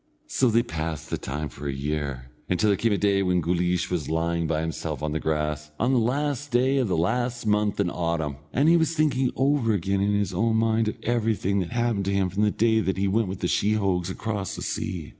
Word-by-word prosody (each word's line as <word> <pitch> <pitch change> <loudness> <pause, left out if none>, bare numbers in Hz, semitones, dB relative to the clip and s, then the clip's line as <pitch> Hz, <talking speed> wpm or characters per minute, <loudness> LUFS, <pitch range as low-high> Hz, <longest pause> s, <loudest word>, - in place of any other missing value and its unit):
So 135 - +2
they 115 +1 +3
passed 80 - -5
the - - -1
time 75 +3 -4
for 70 +2 -8
a - - 0
year, 70 -2 -4 0.2
until 105 +4 +2
there - - +3
came 115 +3 +1
a 100 - +2
day 100 -1 +2
when 90 -2 +2
Guleesh 90 +1 0
was 80 -6 -2
lying 85 +1 0
by 80 -1 0
himself 80 -1 -4
on 75 - -1
the 80 - -1
grass, 75 -1 -2
on 125 +3 +2
the 125 - +4
last 145 +4 -1
day 130 +3 +2
of 130 -4 +2
the 90 - 0
last 120 +7 0
month 105 -1 +1
in 95 -3 +1
autumn, 85 -5 -2
and 140 +4 +2
he 170 +1 +6
was 160 0 +1
thinking 135 -5 +2
over 135 -4 +2
again 95 0 0
in 100 +1 +2
his 100 -2 -1
own 110 +5 +1
mind 110 0 +2
of 110 - -3
everything 110 -4 0
that 90 -3 -2
happened 120 -4 0
to 100 - 0
him 95 -2 +1
from 100 +3 -1
the 105 - +4
day 110 +1 +2
that 95 -3 -1
he 100 +1 +1
went 110 +2 +1
with 95 0 -6
the 90 - +1
sheehogues 100 -3 +1
across 100 0 -3
the - - -6
sea. 85 -5 -4
100 Hz, 235 wpm, -25 LUFS, 85-115 Hz, 0.2 s, he